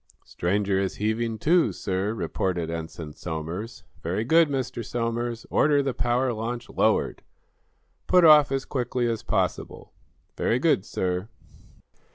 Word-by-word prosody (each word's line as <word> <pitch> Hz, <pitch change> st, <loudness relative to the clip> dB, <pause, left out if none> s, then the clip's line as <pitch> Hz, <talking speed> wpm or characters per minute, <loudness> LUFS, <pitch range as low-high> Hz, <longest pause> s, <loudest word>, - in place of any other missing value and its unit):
"Stranger 95 Hz, +2 st, 0 dB
is 95 Hz, -1 st, -2 dB
heaving 110 Hz, +2 st, -1 dB
to, 165 Hz, +9 st, +3 dB
sir," 95 Hz, +1 st, -2 dB
reported 90 Hz, -4 st, -2 dB
Ensign 80 Hz, -2 st, -6 dB
Somers. 85 Hz, +9 st, -6 dB, 0.2 s
"Very 95 Hz, +6 st, -1 dB
good, 160 Hz, +5 st, +4 dB
Mr. 130 Hz, -4 st, -3 dB
Somers. 115 Hz, 0 st, -3 dB
Order 145 Hz, -1 st, +3 dB
the 135 Hz, -2 st, -1 dB
power 125 Hz, +1 st, 0 dB
launch 120 Hz, +2 st, -4 dB
lowered. -, -, +1 dB, 0.9 s
Put 180 Hz, -2 st, +5 dB
off 150 Hz, -3 st, +7 dB
as 135 Hz, -1 st, -1 dB
quickly 125 Hz, -2 st, -1 dB
as 115 Hz, -2 st, -2 dB
possible." -, -, -2 dB, 0.4 s
"Very -, -, +1 dB
good, -, -, +2 dB
sir." 90 Hz, +3 st, -2 dB
115 Hz, 130 wpm, -25 LUFS, 95-125 Hz, 0.9 s, off